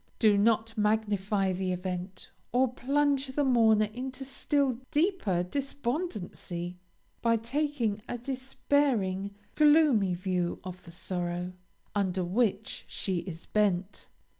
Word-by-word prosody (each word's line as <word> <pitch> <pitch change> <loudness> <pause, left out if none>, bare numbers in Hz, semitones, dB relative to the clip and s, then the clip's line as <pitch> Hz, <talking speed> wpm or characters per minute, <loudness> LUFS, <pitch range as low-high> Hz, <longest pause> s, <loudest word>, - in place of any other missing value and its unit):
Do 215 -3 +5
not 225 +2 +2
magnify 210 -2 +1
the 185 0 -1
event, 180 +1 -5 0.2
or 250 0 +2
plunge 280 +1 +1
the 265 +2 0
mourner 225 -5 +4
into 260 +2 -5
still 270 -2 0
deeper 300 - +1
despondency 235 - -3 0.4
by 230 -1 +3
taking 235 -3 -1
a 245 - -2
despairing, 245 -6 0 0.2
gloomy 295 - +5
view 180 -1 -1
of 185 -1 -7
the 170 - -11
sorrow, 175 0 -3 0.4
under 190 -2 0
which 200 +2 0
she 190 -2 -2
is 170 -2 -7
bent. 200 -2 0
215 Hz, 115 wpm, -29 LUFS, 185-265 Hz, 0.4 s, Do